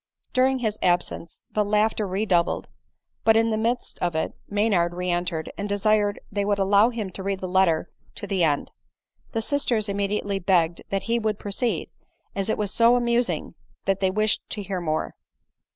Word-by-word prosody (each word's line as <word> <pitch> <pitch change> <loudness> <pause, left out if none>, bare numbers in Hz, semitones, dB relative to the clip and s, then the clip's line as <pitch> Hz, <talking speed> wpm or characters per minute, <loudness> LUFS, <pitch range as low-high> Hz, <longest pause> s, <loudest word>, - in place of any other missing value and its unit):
During 260 +1 +3
his 215 -4 -2
absence 175 -1 0
the 210 - +1
laughter 210 0 +1
redoubled; 185 -3 +1 0.6
but 225 0 +5
in 225 0 +3
the - - +1
midst 235 +3 -1
of 175 -2 -1
it 160 - -1 0.2
Maynard 200 -5 +1
re 180 0 -1
entered, 175 -2 -2
and 205 +1 -3
desired 205 0 +2
they 200 0 0
would 205 0 +1
allow 200 +3 +4
him 220 -6 -4
to 190 - -7
read 195 0 -2
the 185 - -4
letter 180 -3 +2 0.3
to 205 - -5
the 195 -3 0
end. 145 -3 +1 0.6
The 225 -1 0
sisters 235 -6 0
im 200 - -2
mediately 200 0 -1
begged 175 -3 +2
that 195 -1 -1
he 235 +1 +1
would 215 -2 -1
proceed, 215 +4 -2 0.4
as 195 +1 -1
it - - +1
was 205 -2 -2
so 235 +1 +5
amusing 240 0 0 0.3
that 195 0 +1
they 190 - +2
wished 215 +3 +1
to 205 - -4
hear 190 -2 -3
more. 155 -2 -1
200 Hz, 185 wpm, -25 LUFS, 185-220 Hz, 0.6 s, but